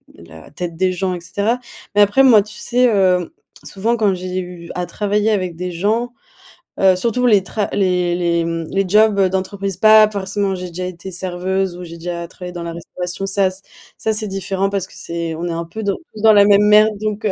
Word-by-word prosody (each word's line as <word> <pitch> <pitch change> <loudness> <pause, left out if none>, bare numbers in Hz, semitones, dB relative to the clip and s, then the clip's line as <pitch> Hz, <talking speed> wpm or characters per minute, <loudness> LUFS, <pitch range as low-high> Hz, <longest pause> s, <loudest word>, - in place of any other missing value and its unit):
la 80 -1 -14
tête 170 +2 -6
des 185 +1 +1
gens 185 +1 -2
et 175 - -8
cetera. 200 +8 -1 0.4
Mais 205 - +5
après 205 +6 +4
moi, 235 -6 +7
tu 210 +1 -12
sais, 250 +1 +1
heu, 180 -3 +2 0.3
souvent 225 +4 -1
quand 210 -3 +2
j'ai 185 0 -4
eu 175 -2 -8
à 180 - -2
travailler 205 +4 0
avec 185 -5 -1
des 180 +2 -4
gens, 220 +7 -1 0.7
heu, 190 -1 +5
surtout 235 +6 0
les 205 -5 +4
tra 205 +1 -3
les 180 -3 +1
les, 170 -1 0
mmh, 165 -1 -3
les 195 0 +1
jobs 210 0 +4
d'entreprise, 190 +1 -3
pas 215 +1 +7
forcément, 200 -1 -2
j'ai 180 -1 -6
déjà 180 +2 -5
été 180 +1 -7
serveuse, 185 +1 -2
ou 180 - -8
j'ai 170 -1 -9
déjà 170 0 -5
travaillé 180 -1 -9
dans 175 -1 -6
la 170 - -5
restauration, 180 +2 -5
ça 195 -1 +2
ç 190 +1 -12 0.4
ça 220 - -1
c'est 215 0 -1
différent 195 0 -2
parce 195 -2 -2
que - - -19
c'est 170 -1 -4
on 165 +2 -5
est - - -3
un 170 0 -3
peu 220 +7 -7
dans 200 -1 0 0.2
tous 215 - -9
dans 220 0 +6
la 205 -1 +6
même 205 0 +5
merde, 215 +1 +6
donc, 215 0 -3
heu, 210 - +2
190 Hz, 220 wpm, -18 LUFS, 175-210 Hz, 0.7 s, moi